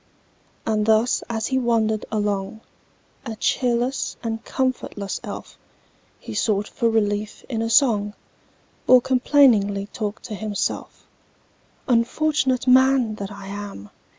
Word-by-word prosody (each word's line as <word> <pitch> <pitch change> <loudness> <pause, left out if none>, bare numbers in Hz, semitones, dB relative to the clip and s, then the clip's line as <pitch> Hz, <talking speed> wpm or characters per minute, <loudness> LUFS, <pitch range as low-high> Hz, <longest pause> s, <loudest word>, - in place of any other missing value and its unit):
And 215 -1 0
thus 220 +2 +3
as 225 -1 -2
he 260 +1 0
wandered 225 -3 0
along, 205 0 -2 0.6
A 225 -4 -5
cheerless 245 +3 0
and 225 -1 -3
comfortless 255 -6 -2
elf, - - -8 0.6
He - - -8
sought 210 -2 0
for 235 -2 0
relief 210 -1 -1
in 225 -4 -2
a 225 - -1
song, 220 -4 +3 0.7
Or 255 - +8
complainingly 245 -6 +3
talked 215 -1 -4
to - - -7
himself:— 210 0 -4 0.8
"Unfortunate 260 +2 +1
man 260 -2 +4
that 200 0 -6
I 200 -1 -9
am! 200 - -8
225 Hz, 120 wpm, -23 LUFS, 205-250 Hz, 0.8 s, Or